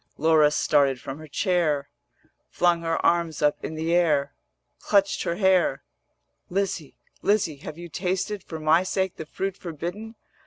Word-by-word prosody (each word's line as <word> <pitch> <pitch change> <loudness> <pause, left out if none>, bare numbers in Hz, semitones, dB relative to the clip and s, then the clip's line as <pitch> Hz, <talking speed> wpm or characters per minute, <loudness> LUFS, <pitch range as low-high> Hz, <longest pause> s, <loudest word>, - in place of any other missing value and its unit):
Laura 155 -1 +5
started 140 -3 +2
from 135 +4 -7
her 155 - -10
chair, 150 -4 0 0.6
Flung 175 -1 +2
her 165 -1 -1
arms 170 -3 +1
up 150 0 +1
in 160 - -4
the 160 +2 -1
air, 150 -5 +2 0.5
Clutched 200 -1 +2
her 170 - -1
hair: 185 -7 +2 0.7
'Lizzie, 185 -5 -2 0.2
Lizzie, 190 -8 +1
have 155 +2 -9
you 175 0 -8
tasted 185 +4 -2
For 160 - -7
my 155 +2 +4
sake 190 0 -2
the 160 - -7
fruit 195 +3 -3
forbidden? 180 +7 -6
170 Hz, 150 wpm, -25 LUFS, 155-185 Hz, 0.7 s, Laura